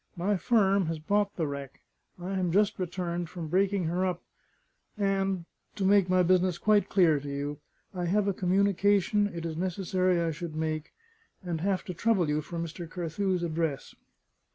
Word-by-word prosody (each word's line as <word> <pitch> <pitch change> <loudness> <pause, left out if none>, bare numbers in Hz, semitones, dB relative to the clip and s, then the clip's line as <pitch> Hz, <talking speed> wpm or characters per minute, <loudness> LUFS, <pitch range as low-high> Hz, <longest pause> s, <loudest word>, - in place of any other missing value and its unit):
My 195 +4 0
firm 195 -3 +2
has 165 0 -2
bought 200 +6 0
the 165 - -1
wreck; 140 -2 -6 0.4
I 180 +2 -6
am 185 -3 0
just 205 +2 +2
returned 175 -2 -3
from 165 -3 -6
breaking 195 +2 +2
her 175 +3 0
up; 180 -2 -2 0.7
and 195 -3 0 0.3
to 195 - -1
make 195 -1 +4
my 185 0 +4
business 180 0 +3
quite 210 +2 +3
clear 170 -6 +4
to 145 +1 -7
you 145 +1 -4 0.3
I 180 -2 -3
have 200 +3 +1
a 200 - +2
communication 200 +2 +2
it 170 -4 -6
is 160 -1 -4
necessary 185 0 0
I 165 -1 0
should 165 0 -6
make; 155 -1 -3 0.5
and 170 -3 -3
have 190 -1 0
to 180 - -5
trouble 195 -3 +1
you 150 +1 +1
for 170 +3 -7
Mr. 165 0 -5
Carthew's 180 +2 -2
address." 160 -4 -2
180 Hz, 175 wpm, -29 LUFS, 165-195 Hz, 0.7 s, make